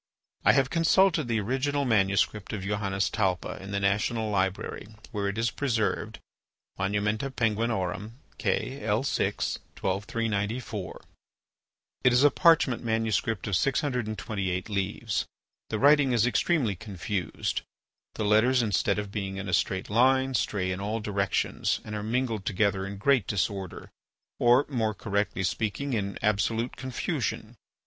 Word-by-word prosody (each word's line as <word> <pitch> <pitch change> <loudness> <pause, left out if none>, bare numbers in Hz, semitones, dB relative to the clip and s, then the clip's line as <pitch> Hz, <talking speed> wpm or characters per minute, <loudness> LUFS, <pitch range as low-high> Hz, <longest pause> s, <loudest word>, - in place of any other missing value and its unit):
I - - +6
have 135 -1 +2
consulted 165 -2 +3
the 115 -2 +1
original 135 +6 0
manuscript 105 -2 +1
of 100 -3 -4
Johannes 100 -1 -1
Talpa 95 -5 -1
in 95 - -8
the 100 0 -1
National 105 +3 0
Library, 95 0 -1 0.2
where 100 -3 -2
it 100 +2 -3
is 115 0 +1
preserved 120 -6 -1 0.6
(Monumenta 105 +5 0
Peng., 115 -4 +1
K. 115 +5 -2
_L_6., 110 +5 0 0.2
12390 105 +3 -1
four). 105 -6 -7 1.0
It 125 - +6
is 125 +3 +4
a 145 - +7
parchment 165 -9 +4
manuscript 110 -2 0
of 100 - 0
628 110 - -1
leaves. 100 +2 -1 0.4
The 110 - -1
writing 140 +1 +5
is 115 -1 +3
extremely 125 - +1
confused, 95 -1 -3 0.5
the 110 - -2
letters 120 +4 +4
instead 100 -1 +1
of 105 -1 -4
being 95 -2 -4
in 100 +1 -5
a 90 - -3
straight 95 +2 0
line, 130 +3 +3
stray 95 -6 0
in 90 +1 -3
all 105 +3 -2
directions 100 -2 0
and 105 - -7
are 105 - -3
mingled 115 -2 -1
together 95 -1 +1
in 100 0 -6
great 125 0 +2
disorder, 95 -2 -3 0.5
or, 120 +3 +5
more 110 -6 -1
correctly 100 -1 -1
speaking, 110 +8 -1
in 100 -3 -2
absolute 110 +3 +1
confusion. 130 -2 -3
110 Hz, 135 wpm, -28 LUFS, 100-125 Hz, 1.0 s, a